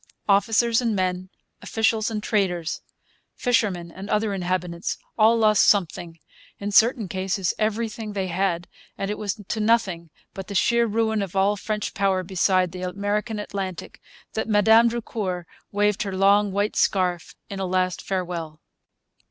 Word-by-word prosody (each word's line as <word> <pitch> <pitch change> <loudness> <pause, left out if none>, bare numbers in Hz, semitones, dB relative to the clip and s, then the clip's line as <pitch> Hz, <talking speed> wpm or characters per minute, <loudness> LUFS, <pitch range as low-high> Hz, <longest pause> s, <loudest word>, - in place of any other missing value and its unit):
Officers 225 +4 +3
and 230 -3 0
men, 185 -1 -1 0.3
officials 225 -1 +1
and 215 -2 -4
traders, 180 -7 -1 0.5
fishermen 195 -9 0
and 190 +4 -9
other 210 -1 +1
inhabitants, 180 -2 -2 0.2
all 225 +1 +5
lost 215 -2 +4
something, 175 -4 +1 0.4
in 205 +1 -4
certain 225 +1 +4
cases 190 +1 -1
everything 220 0 -2
they 195 -2 -1
had; 175 -1 -1 0.3
and 195 +1 -2
it 210 - -3
was 210 0 -3
to 220 - -2
nothing 200 -7 +1 0.2
but 195 -1 -7
the 200 - -6
sheer 235 +4 +3
ruin 220 0 0
of 195 -2 -5
all 195 +2 +3
French 210 +1 -3
power 190 -2 +1
beside 185 0 +1
the 180 0 -7
American 205 +4 -2
Atlantic 195 -3 -5 0.3
that 220 - -3
Madame 220 +2 +5
Drucour 210 -6 -4 0.3
waved 205 0 +1
her 195 -2 -3
long 200 +1 +4
white 205 +2 -1
scarf 180 -3 0
in 195 - -6
a 190 - -2
last 185 -1 0
farewell. 175 -5 -4
200 Hz, 150 wpm, -24 LUFS, 185-215 Hz, 0.5 s, all